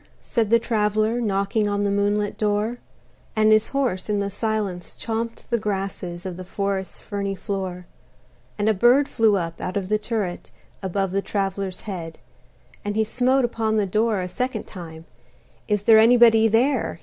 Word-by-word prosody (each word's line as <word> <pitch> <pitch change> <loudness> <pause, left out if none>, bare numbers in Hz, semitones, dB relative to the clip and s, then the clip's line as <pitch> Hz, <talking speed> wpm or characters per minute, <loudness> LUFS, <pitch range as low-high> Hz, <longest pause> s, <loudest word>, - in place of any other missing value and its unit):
said 230 -5 0
the 230 - +6
Traveler, 215 0 0
Knocking 205 0 0
on 205 0 0
the 200 - +1
moonlit 205 +1 0
door; 215 +3 0 0.6
And 215 0 +4
his 215 0 +4
horse 245 -9 -1
in 210 - +1
the 200 0 -1
silence 205 -4 -3
chomped 230 0 -4
the 235 - +2
grasses 195 -4 -4
Of 180 -2 -5
the 185 - -6
forest's 195 0 -3
ferny 200 -1 -3
floor. 190 -3 -4 0.7
And 205 0 0
a 220 - +4
bird 245 +7 +4
flew 225 -3 +3
up 165 -3 -3
out 185 - -3
of 190 -1 -3
the 215 0 +2
turret, 210 -5 -3 0.3
Above 195 0 -1
the 195 +1 0
traveler's 195 -2 -3
head: 170 -6 -6 0.7
And 205 -1 -3
he 220 - +3
smote 250 +4 +2
upon 220 -2 -1
the 210 - +2
door 215 +1 +1
a 180 - -3
second 245 +2 -3
time; 165 -4 -10 0.6
"Is 210 -2 0
there 220 0 +7
anybody 225 -1 +6
there?" 235 - +1
210 Hz, 170 wpm, -23 LUFS, 195-225 Hz, 0.7 s, there